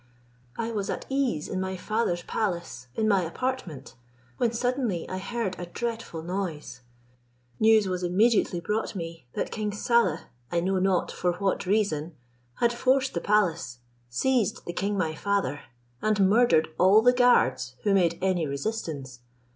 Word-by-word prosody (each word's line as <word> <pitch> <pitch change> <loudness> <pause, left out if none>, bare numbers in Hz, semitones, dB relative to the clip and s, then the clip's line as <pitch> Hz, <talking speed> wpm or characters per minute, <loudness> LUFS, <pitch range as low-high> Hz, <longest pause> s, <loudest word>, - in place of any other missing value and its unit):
I 230 0 -2
was 205 -3 -3
at - - -3
ease 265 - 0
in 185 - -3
my 190 0 -3
father's 180 -3 -1
palace, 170 - -3
in 220 - +1
my 200 -3 +4
apartment, 180 - -4 0.4
when 235 - +1
suddenly 240 -6 -1
I 185 - -4
heard 210 -2 -3
a 175 - -5
dreadful 225 -5 -4
noise: 170 -7 -4 0.8
news 220 -2 +5
was 185 -1 -2
immediately 185 +1 +2
brought 210 +5 -2
me, 165 -6 -7
that - - -3
king 215 -1 -2
Saleh, 235 +3 +2 0.3
I 170 - +2
know 185 +2 0
not 185 -1 +1
for 180 -1 0
what 190 +1 -1
reason, 175 -6 0 0.4
had 235 0 +2
forced 260 +2 +2
the 170 - -2
palace, 170 -11 +1 0.3
seized 235 - 0
the 175 - -4
king 200 +3 -1
my 165 -4 0
father, 195 -7 -1 0.4
and 210 -3 +3
murdered 210 -7 +4
all 195 +4 +6
the 245 +1 +6
guards 185 - +3
who 205 - +2
made 170 -3 +3
any 180 -4 +1
resistance. 140 - -4
195 Hz, 155 wpm, -27 LUFS, 170-225 Hz, 0.8 s, all